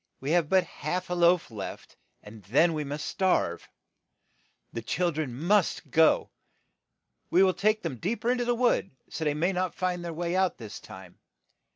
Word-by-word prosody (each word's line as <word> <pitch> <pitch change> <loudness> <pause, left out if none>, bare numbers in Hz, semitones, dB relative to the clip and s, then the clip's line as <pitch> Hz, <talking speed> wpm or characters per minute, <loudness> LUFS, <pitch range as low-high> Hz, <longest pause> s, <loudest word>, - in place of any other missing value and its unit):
We 135 +3 -3
have 170 -3 +2
but 190 -1 +4
half 180 +4 -4
a - - +1
loaf 175 -4 +3
left, 105 -3 -8 0.3
and 105 +1 -12
then 155 - +3
we 155 -1 -2
must 145 +1 -5
starve. 180 - 0 1.0
The 115 - -4
chil 175 +9 0
dren 155 -4 -3
must 175 +9 0
go; 160 -2 +4 1.0
we 185 - +5
will 190 -1 +4
take 215 +3 +1
them 155 -7 -4
deep 220 - -3
er 240 - +3
in 250 - 0
to 245 - 0
the 240 0 +1
wood, 240 -5 +1 0.2
so 160 - -4
that - - +3
they 145 - -1
may 175 +5 +1
not 185 -1 -2
find 180 -1 -2
the 170 - -4
way 170 +2 -2
out 190 -1 +1
this 110 -4 -8
time. 95 -2 -13
170 Hz, 195 wpm, -28 LUFS, 145-185 Hz, 1.0 s, we